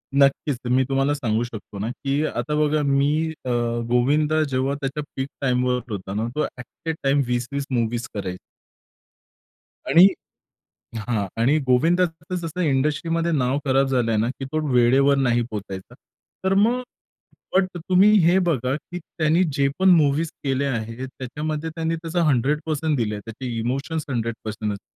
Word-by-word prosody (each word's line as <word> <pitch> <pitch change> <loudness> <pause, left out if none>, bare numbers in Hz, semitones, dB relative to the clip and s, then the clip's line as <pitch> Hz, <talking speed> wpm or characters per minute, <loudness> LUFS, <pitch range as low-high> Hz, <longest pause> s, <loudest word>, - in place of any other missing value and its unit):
नक्कीच, 140 0 +3
तर 120 - -4
मी 130 +1 +3
तुम्हाला 135 +1 +2
सांगू 120 -5 0
शकतो 110 -4 -8
ना, 105 +3 -2
की 140 +3 -1
आता 135 +1 -2
बघा. 150 0 +2
मी 140 0 +2 0.4
अ, - - -2 0.4
गोविंदा 150 +6 +2
जेव्हा 135 -1 -1
त्याच्या 140 +2 -3
पीक 130 0 -2
टाइमवर 125 -1 +1
होता 95 -1 -5
ना, 110 +3 -1
तो 150 - +1
ॲट 125 +6 -9
अ - - +3
टाइम 140 +1 +3
20-20 125 +3 -2
मुव्हीज 120 -1 -1
करायचा. 95 -3 -4 1.5
आणि 175 +3 +8 0.9
हां, 110 -3 -2
आणि 135 +6 +4
गोविंदा 165 +8 +4 0.3
जसं 170 0 -5
इंडस्ट्रीमध्ये 160 +3 +1
नाव 130 -3 +1
खराब 135 0 +3
झालंय 120 -4 +1
ना, 110 +3 +1
की 135 +1 -6
तो 155 +4 -2
वेळेवर 135 +3 +4
नाही 120 -3 +2
पोहोचायचा. 95 -3 -7 0.5
तर 190 0 +2
मग 225 +6 +3 0.7
बट 190 -1 +4
तुम्ही 185 +4 +4
हे 175 +3 +5
बघा, 130 -5 0
की 175 +4 -8
त्यानी 160 +1 +1
जेपण 140 +7 +2
मूवीज 155 -2 +4
केल्या 135 0 0
आहेत, 115 +3 -4
त्याच्यामध्ये 150 +5 -4
त्यांनी 165 0 -2
त्याचं 165 +1 -3
100% 150 +3 +1
दिलंय. 105 -3 -1
त्याचे 115 +4 -8
इमोशन्स 135 +7 -2
100% 115 -3 -3
असतात. 100 - -10
135 Hz, 150 wpm, -23 LUFS, 120-155 Hz, 1.5 s, आणि